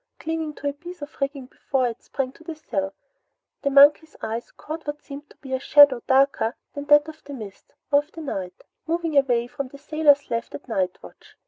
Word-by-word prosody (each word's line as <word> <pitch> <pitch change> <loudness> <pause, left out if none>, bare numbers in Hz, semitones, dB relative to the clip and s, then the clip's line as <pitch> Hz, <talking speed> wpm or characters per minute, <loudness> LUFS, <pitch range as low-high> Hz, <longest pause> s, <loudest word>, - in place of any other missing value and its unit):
Clinging 320 -1 -3
to 285 - -5
a 285 - 0
piece 345 +2 -10
of 290 - -9
rigging 275 -1 -2
before 260 0 -1
it 235 -1 -6
sprang 265 -2 -3
to 325 - -18
the 325 -1 -6
sill, 195 -11 -3 0.7
the 280 - +1
monkey's 290 +3 +6
eyes 225 +2 -4
caught 315 0 -8
what 295 0 -5
seemed 290 +1 -10
to - - -20
be 265 -2 -8
a 260 - +1
shadow 280 -3 +6
darker 265 -3 +3 0.2
than 285 0 -6
that 295 +1 +6
of 315 0 -11
the 285 - -9
mist 210 -5 -11 0.2
or 285 - +6
of 295 +2 -8
the 325 - -8
night, 185 - -5 0.2
moving 330 -1 -1
away 245 -4 +3
from 275 +2 -5
the 280 - -13
sailor 300 0 +4 0.2
left 230 0 -3
at 280 - -10
night 190 -6 -1
watch. - - -15
280 Hz, 215 wpm, -24 LUFS, 255-305 Hz, 0.7 s, monkey's